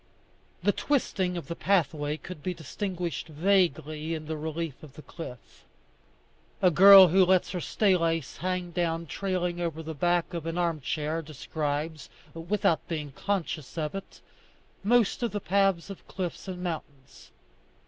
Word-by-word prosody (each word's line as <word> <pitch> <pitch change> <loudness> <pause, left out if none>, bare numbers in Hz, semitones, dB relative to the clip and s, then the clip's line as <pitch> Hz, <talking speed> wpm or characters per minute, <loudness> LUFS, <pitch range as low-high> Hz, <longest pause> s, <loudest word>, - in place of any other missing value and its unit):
The - - +4
twisting 190 -10 0
of 170 - -5
the 170 - -5
pathway 155 -6 +1
could 170 -2 -9
be 180 +4 -3
distinguished 175 +2 -4
vaguely 160 -2 +1
in 155 -1 -6
the 160 +1 -3
relief 160 -1 -4
of 150 -4 -13
the 155 - -12
cliff. 125 -8 -10 1.0
A 185 - +4
girl 195 +2 +10
who 190 +3 +5
lets 185 0 +3
her 180 - -3
stay 200 +1 +2
lace 165 -4 -1
hang 180 -1 -2
down 170 -1 -1
trailing 180 +1 -2
over 160 -2 -3
the 160 0 -5
back 175 +4 +1
of 165 -1 -4
an 165 +1 -3
armchair, 160 -1 -1
describes, 155 0 -4 0.2
without 170 0 0
being 155 -5 -4
conscious 165 -2 -3
of 155 -2 -2
it, 195 0 -8 0.6
most 230 +1 +3
of 235 - +1
the 205 - -3
paths 195 -1 +1
of 195 - -11
cliffs 185 +1 -5
and 180 -1 -5
mountains. 150 -6 -7
170 Hz, 150 wpm, -28 LUFS, 155-185 Hz, 1.0 s, girl